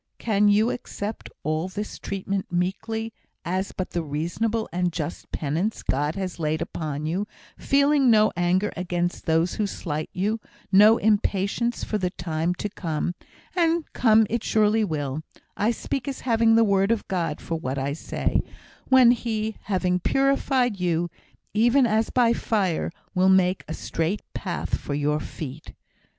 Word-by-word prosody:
Can 210 Hz, -2 st, +2 dB
you 210 Hz, +3 st, +4 dB
accept 210 Hz, -3 st, -5 dB
all 155 Hz, +3 st, -1 dB
this 205 Hz, +3 st, -6 dB
treatment 195 Hz, -1 st, -3 dB
meekly, 220 Hz, +5 st, -2 dB, 0.3 s
as 185 Hz, +3 st, -1 dB
but 185 Hz, -, -4 dB
the 170 Hz, -, -1 dB
reasonable 175 Hz, +10 st, -2 dB
and 180 Hz, 0 st, +1 dB
just 160 Hz, -1 st, -5 dB
penance 165 Hz, +9 st, -2 dB
God 145 Hz, +4 st, 0 dB
has 190 Hz, -3 st, -4 dB
laid 155 Hz, 0 st, 0 dB
upon 155 Hz, -2 st, -4 dB
you 185 Hz, +6 st, -1 dB, 0.3 s
feeling 280 Hz, -1 st, +3 dB
no 215 Hz, -1 st, +5 dB
anger 180 Hz, +4 st, +1 dB
against 175 Hz, 0 st, -2 dB
those 165 Hz, +2 st, +2 dB
who 210 Hz, -, -1 dB
slight 155 Hz, -5 st, -4 dB
you, 210 Hz, +5 st, -1 dB, 0.3 s
no 210 Hz, +3 st, +7 dB
impatience 210 Hz, +2 st, +1 dB
for 215 Hz, -, -1 dB
the 180 Hz, -2 st, 0 dB
time 170 Hz, -1 st, -2 dB
to 210 Hz, -, -3 dB
come 175 Hz, -4 st, -3 dB, 0.4 s
(and 335 Hz, -2 st, +2 dB
come 220 Hz, -2 st, +5 dB
it 230 Hz, +2 st, -2 dB
surely 215 Hz, 0 st, +3 dB
will 150 Hz, -5 st, -2 dB, 0.3 s
I 210 Hz, +2 st, +1 dB
speak 240 Hz, +2 st, -3 dB
as 275 Hz, -, -4 dB
having 230 Hz, -2 st, +3 dB
the 230 Hz, -, +6 dB
word 195 Hz, -2 st, +3 dB
of 230 Hz, -3 st, -1 dB
God 170 Hz, -5 st, -1 dB
for -, -, -5 dB
what 135 Hz, -3 st, -3 dB
I 135 Hz, +1 st, -1 dB
say) 155 Hz, -, -1 dB, 0.5 s
when 260 Hz, -2 st, +7 dB
He, 220 Hz, -3 st, -2 dB
having 185 Hz, -2 st, +1 dB
purified 265 Hz, -2 st, +1 dB
you, 175 Hz, -1 st, 0 dB, 0.4 s
even 240 Hz, +5 st, +4 dB
as 220 Hz, 0 st, +1 dB
by 240 Hz, -2 st, +3 dB
fire, 195 Hz, -8 st, 0 dB, 0.2 s
will 185 Hz, 0 st, +4 dB
make 185 Hz, -1 st, +3 dB
a 160 Hz, -, -4 dB
straight 165 Hz, +6 st, -2 dB
path 185 Hz, -3 st, -3 dB
for 145 Hz, -, -4 dB
your 150 Hz, +1 st, +1 dB
feet? 155 Hz, -1 st, -8 dB
195 Hz, 155 wpm, -25 LUFS, 170-225 Hz, 0.5 s, no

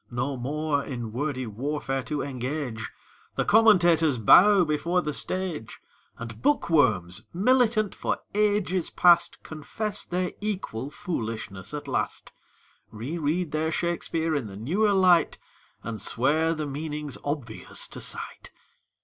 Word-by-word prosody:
No 125 Hz, +3 st, -2 dB
more 145 Hz, +3 st, -1 dB
in 120 Hz, -4 st, -5 dB
wordy 130 Hz, +1 st, -2 dB
warfare 135 Hz, +4 st, -3 dB
to 145 Hz, 0 st, -2 dB
engage, 130 Hz, -3 st, -4 dB, 0.5 s
The -, -, 0 dB
commentators 175 Hz, -, +5 dB
bow 190 Hz, -, +7 dB
before 170 Hz, +4 st, 0 dB
the 150 Hz, -, -2 dB
stage, 180 Hz, -11 st, -3 dB, 0.4 s
And 115 Hz, -1 st, -8 dB
bookworms, 110 Hz, -, +2 dB
militant 220 Hz, 0 st, +3 dB
for -, -, -2 dB, 0.2 s
ages 205 Hz, -4 st, +1 dB
past, 175 Hz, -1 st, +4 dB
Confess 190 Hz, +7 st, -4 dB
their 180 Hz, 0 st, -2 dB
equal 185 Hz, -, -3 dB
foolishness 110 Hz, -, -5 dB
at 145 Hz, -1 st, -6 dB
last, 135 Hz, -, -3 dB, 0.6 s
Reread 150 Hz, +8 st, -2 dB
their 155 Hz, +1 st, 0 dB
Shakspeare 165 Hz, -1 st, -1 dB
in 140 Hz, -7 st, -1 dB
the 95 Hz, -1 st, -9 dB
newer 190 Hz, -, +1 dB
light 180 Hz, -4 st, +4 dB, 0.5 s
And 115 Hz, -2 st, -5 dB
swear 155 Hz, +7 st, +1 dB
the 155 Hz, -1 st, -3 dB
meaning's 150 Hz, 0 st, -5 dB
obvious 140 Hz, -7 st, -4 dB
to -, -, -7 dB
sight. -, -, -6 dB
150 Hz, 125 wpm, -26 LUFS, 125-175 Hz, 0.6 s, bow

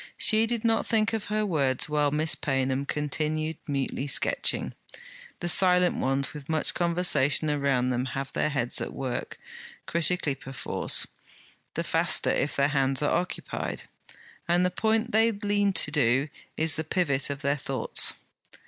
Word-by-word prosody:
She 220 Hz, +1 st, +4 dB
did 235 Hz, -1 st, -3 dB
not 225 Hz, -1 st, +1 dB
think 220 Hz, -1 st, +1 dB
of 220 Hz, -2 st, -2 dB
her 215 Hz, 0 st, -1 dB
words 140 Hz, -9 st, +1 dB
while 150 Hz, -1 st, +1 dB
Miss 150 Hz, +2 st, +2 dB
Paynham 135 Hz, 0 st, -1 dB
continued 155 Hz, +1 st, -2 dB
mutely 140 Hz, -1 st, -2 dB
sketching. -, -, +1 dB, 0.7 s
The 175 Hz, -, -2 dB
silent 180 Hz, 0 st, +4 dB
ones, 135 Hz, +2 st, 0 dB
with 150 Hz, -1 st, -10 dB
much 160 Hz, -1 st, 0 dB
conversation 170 Hz, -4 st, +2 dB
around 140 Hz, -3 st, 0 dB
them, 125 Hz, +1 st, -1 dB
have 135 Hz, +1 st, -5 dB
their -, -, 0 dB
heads 135 Hz, -5 st, -2 dB
at -, -, -5 dB
work, 130 Hz, -2 st, -4 dB, 0.5 s
critically 170 Hz, -2 st, 0 dB
perforce; 135 Hz, -1 st, -1 dB, 0.7 s
the -, -, -1 dB
faster -, -, +2 dB
if 150 Hz, -, -1 dB
their 140 Hz, +1 st, +2 dB
hands 135 Hz, -1 st, 0 dB
are -, -, +1 dB
occupied; 180 Hz, -, -4 dB, 0.6 s
and 175 Hz, +1 st, +2 dB
the 180 Hz, -, 0 dB
point 220 Hz, +5 st, 0 dB
they 225 Hz, +1 st, +4 dB
lean 205 Hz, -1 st, 0 dB
to 150 Hz, -, +2 dB
do 135 Hz, -1 st, +2 dB, 0.3 s
is 160 Hz, 0 st, +2 dB
the 160 Hz, -, -2 dB
pivot 150 Hz, -5 st, 0 dB
of 140 Hz, +1 st, -5 dB
their 140 Hz, +1 st, +1 dB
thoughts. -, -, +1 dB
150 Hz, 155 wpm, -27 LUFS, 135-180 Hz, 0.7 s, She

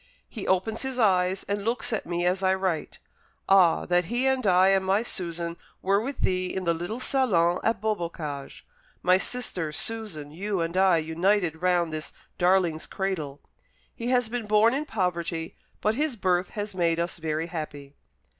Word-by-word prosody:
He 215 Hz, -, -7 dB
opens 190 Hz, +4 st, +1 dB
his 265 Hz, -1 st, -3 dB
eyes, 190 Hz, -4 st, +2 dB
and 200 Hz, 0 st, -3 dB
looks 235 Hz, +2 st, -1 dB
at -, -, -2 dB
me 175 Hz, 0 st, -1 dB
as 185 Hz, +2 st, +1 dB
I 190 Hz, 0 st, +3 dB
write. 190 Hz, -4 st, -2 dB, 0.5 s
Ah! 190 Hz, -4 st, +5 dB
that 175 Hz, 0 st, +2 dB
he 240 Hz, +8 st, 0 dB
and 265 Hz, -4 st, +1 dB
I 185 Hz, +1 st, +5 dB
and 195 Hz, -1 st, +3 dB
my 195 Hz, +4 st, +2 dB
Susan 170 Hz, -5 st, -3 dB, 0.3 s
were 195 Hz, +2 st, +3 dB
with 265 Hz, +3 st, -5 dB
thee 185 Hz, 0 st, +1 dB
in 190 Hz, 0 st, -3 dB
the 170 Hz, -1 st, +2 dB
little 175 Hz, +8 st, -4 dB
salon 185 Hz, -11 st, +2 dB
at 225 Hz, -, +1 dB
Beaubocage 170 Hz, -9 st, -4 dB, 0.4 s
my 185 Hz, +1 st, +5 dB
sister, 190 Hz, -10 st, -1 dB
Susan, 170 Hz, -5 st, -4 dB
you, 195 Hz, +4 st, -2 dB
and 165 Hz, +1 st, -2 dB
I 190 Hz, -2 st, +5 dB
united 165 Hz, +1 st, +1 dB
round 175 Hz, -3 st, +2 dB
this 155 Hz, 0 st, -5 dB, 0.3 s
darling's 175 Hz, -3 st, +2 dB
cradle. 165 Hz, -8 st, -3 dB, 0.5 s
He 235 Hz, -, -5 dB
has 245 Hz, -2 st, +2 dB
been 235 Hz, -1 st, -4 dB
born 215 Hz, +3 st, +4 dB
in 290 Hz, +3 st, -1 dB
poverty, 170 Hz, -, -2 dB, 0.3 s
but 215 Hz, -, +2 dB
his 290 Hz, +1 st, -1 dB
birth 185 Hz, -3 st, +1 dB
has 205 Hz, 0 st, -3 dB
made 170 Hz, -2 st, +1 dB
us 170 Hz, 0 st, -2 dB
very 160 Hz, 0 st, -2 dB
happy." 150 Hz, -4 st, -6 dB
185 Hz, 175 wpm, -26 LUFS, 170-210 Hz, 0.5 s, Ah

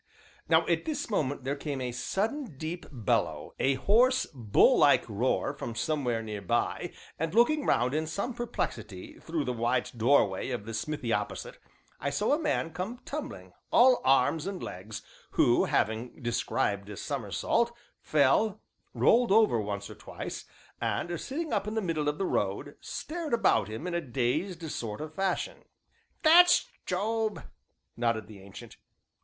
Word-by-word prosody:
Now -, -, +5 dB
at -, -, 0 dB
this 310 Hz, -7 st, -3 dB
moment 145 Hz, -8 st, -1 dB
there 135 Hz, +2 st, -1 dB
came 145 Hz, -1 st, -4 dB
a 125 Hz, -1 st, -3 dB
sudden 200 Hz, -, -2 dB
deep 160 Hz, +4 st, -5 dB
bellow, 120 Hz, -7 st, -1 dB
a 135 Hz, +1 st, +3 dB
hoarse, 240 Hz, -, +3 dB
bull 115 Hz, -7 st, +4 dB
like -, -, +5 dB
roar -, -, 0 dB
from 115 Hz, -, -6 dB
somewhere 125 Hz, -6 st, -1 dB
near 105 Hz, -2 st, -5 dB
by, 120 Hz, +2 st, -1 dB, 0.3 s
and, 160 Hz, +4 st, -2 dB
looking 285 Hz, +6 st, +4 dB
round 125 Hz, +2 st, +2 dB
in 155 Hz, +1 st, 0 dB
some 200 Hz, +10 st, -3 dB
perplexity, 230 Hz, -, -5 dB
through 160 Hz, -2 st, -2 dB
the 125 Hz, -, -1 dB
wide 120 Hz, +1 st, 0 dB
doorway 115 Hz, -5 st, +3 dB
of 120 Hz, -5 st, -4 dB
the 115 Hz, -, -6 dB
smithy 120 Hz, +1 st, -2 dB
opposite, 105 Hz, 0 st, -3 dB, 0.4 s
I 140 Hz, -, -1 dB
saw 205 Hz, -, +1 dB
a 295 Hz, -, +2 dB
man 295 Hz, -, -1 dB
come 185 Hz, +8 st, -4 dB
tumbling, 305 Hz, +2 st, -6 dB, 0.2 s
all 250 Hz, +1 st, +6 dB
arms 135 Hz, +5 st, +3 dB
and 195 Hz, -2 st, -4 dB
legs, 105 Hz, +4 st, -7 dB, 0.3 s
who, -, -, +4 dB
having 110 Hz, +4 st, -1 dB
described 105 Hz, -4 st, -1 dB
a 105 Hz, -, -7 dB
somersault, 140 Hz, -, 0 dB, 0.3 s
fell, 155 Hz, +9 st, +2 dB, 0.4 s
rolled 240 Hz, -2 st, +4 dB
over 210 Hz, -, +5 dB
once 100 Hz, -1 st, -4 dB
or -, -, -9 dB
twice, -, -, -7 dB, 0.4 s
and 175 Hz, -1 st, -2 dB
sitting 315 Hz, +3 st, -4 dB
up 200 Hz, -, 0 dB
in 215 Hz, -, -3 dB
the -, -, +2 dB
middle 165 Hz, -7 st, 0 dB
of 150 Hz, -, -3 dB
the 195 Hz, -, -1 dB
road, -, -, -1 dB
stared 315 Hz, -5 st, -3 dB
about 200 Hz, -, +3 dB
him 110 Hz, +9 st, -6 dB
in 180 Hz, -, -3 dB
a 170 Hz, -, 0 dB
dazed 155 Hz, +7 st, -2 dB
sort 105 Hz, -3 st, -4 dB
of 155 Hz, 0 st, -6 dB
fashion. 190 Hz, 0 st, -1 dB, 0.6 s
"That's 350 Hz, +3 st, +7 dB, 0.2 s
Job!" 215 Hz, +3 st, -1 dB, 0.5 s
nodded 115 Hz, -2 st, 0 dB
the 105 Hz, -3 st, -13 dB
Ancient. 95 Hz, 0 st, -12 dB
150 Hz, 160 wpm, -29 LUFS, -, 0.6 s, That's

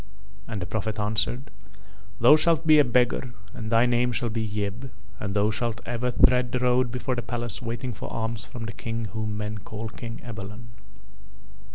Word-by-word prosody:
And 110 Hz, -3 st, -4 dB
the 90 Hz, -, -3 dB
Prophet 110 Hz, +3 st, -2 dB
answered: 110 Hz, +6 st, 0 dB, 0.7 s
"Thou 120 Hz, +6 st, +8 dB
shalt 165 Hz, 0 st, +3 dB
be 155 Hz, -1 st, +7 dB
a -, -, +8 dB
beggar 125 Hz, 0 st, +1 dB, 0.2 s
and 110 Hz, +1 st, -5 dB
thy 115 Hz, +1 st, +5 dB
name 120 Hz, 0 st, +2 dB
shall 120 Hz, -1 st, -1 dB
be 115 Hz, +1 st, -1 dB
Yeb, 105 Hz, +5 st, -3 dB, 0.3 s
and 100 Hz, -1 st, -3 dB
thou 105 Hz, +1 st, +3 dB
shalt 115 Hz, +1 st, -2 dB
ever 120 Hz, +1 st, -1 dB
tread 125 Hz, 0 st, +4 dB
the -, -, +1 dB
road 125 Hz, 0 st, +3 dB
before 125 Hz, +1 st, -2 dB
the 120 Hz, -, -1 dB
palace 120 Hz, -1 st, -3 dB
waiting 120 Hz, +1 st, -3 dB
for -, -, -7 dB
alms 115 Hz, 0 st, -3 dB
from 115 Hz, -1 st, -6 dB
the 110 Hz, -, -5 dB
King 115 Hz, 0 st, -3 dB
whom 110 Hz, -1 st, -2 dB
men 105 Hz, 0 st, -3 dB
shall 105 Hz, -, -11 dB
call 110 Hz, +1 st, -5 dB
Ebalon." 115 Hz, -1 st, -7 dB
115 Hz, 185 wpm, -26 LUFS, 110-125 Hz, 0.7 s, Thou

